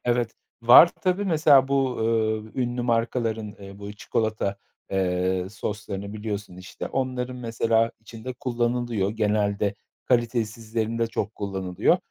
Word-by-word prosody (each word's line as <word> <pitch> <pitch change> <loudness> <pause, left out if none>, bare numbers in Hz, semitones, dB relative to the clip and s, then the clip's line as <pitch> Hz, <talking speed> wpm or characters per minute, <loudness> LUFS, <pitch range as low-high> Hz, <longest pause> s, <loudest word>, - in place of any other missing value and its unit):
Evet, 120 -1 +1 0.3
var 120 +8 +10
tabii. 185 +2 +1
Mesela 150 -6 +5
bu, 135 -2 +1
ııı, 110 -1 0
ünlü 125 -1 -1
markaların, 115 -2 0
eee, 100 0 -11
bu 100 0 -7
çikolata, 110 -1 -1 0.4
eee, 90 -1 0
soslarını 100 0 -5
biliyorsun 105 -3 -5
işte. 90 +1 -7
Onların 130 -1 -2
mesela 115 -1 +1
içinde 115 +3 -8
kullanılıyor, 120 -4 -1
genelde 105 -1 0 0.3
kalitesizlerinde 115 -1 0
çok 110 -1 -3
kullanılıyor. 95 -3 +1
110 Hz, 115 wpm, -25 LUFS, 105-120 Hz, 0.4 s, var